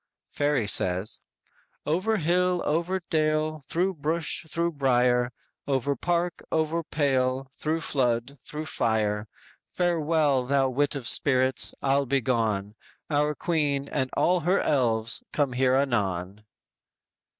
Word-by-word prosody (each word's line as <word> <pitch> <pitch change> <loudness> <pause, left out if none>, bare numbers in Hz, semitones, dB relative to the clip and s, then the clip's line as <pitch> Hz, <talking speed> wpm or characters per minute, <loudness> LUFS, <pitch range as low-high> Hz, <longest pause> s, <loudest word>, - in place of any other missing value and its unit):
"_ - - -24
Fairy 145 -5 +1
says: 95 0 +1 0.6
_"Over 185 +8 +1
hill, 180 +2 +1
over 170 +5 0
dale, 155 0 0
Through 185 +3 0
bush, 160 +2 -1
through 170 +1 0
brier, 125 -4 +2 0.4
Over 140 0 0
park, 175 +4 -1
over 160 +1 0
pale, 135 -4 0
Through 160 +1 -1
flood, 125 -1 -1
through 150 +4 -7
fire, 110 -5 0 0.4
Farewell, 155 -6 +1
thou 135 -1 +2
wit 145 +3 +1
of 130 -5 -4
spirits, 130 -2 +3
I'll 140 0 +2
be 135 +2 +2
gone; 110 -5 -1 0.4
Our 150 +1 +1
queen 145 -5 -1
and 130 -3 -1
all 180 +1 +3
her 180 +4 +1
elves 115 -5 0
come 140 -4 0
here 130 +1 +2
anon." 100 -7 -1
140 Hz, 125 wpm, -26 LUFS, 125-160 Hz, 0.6 s, spirits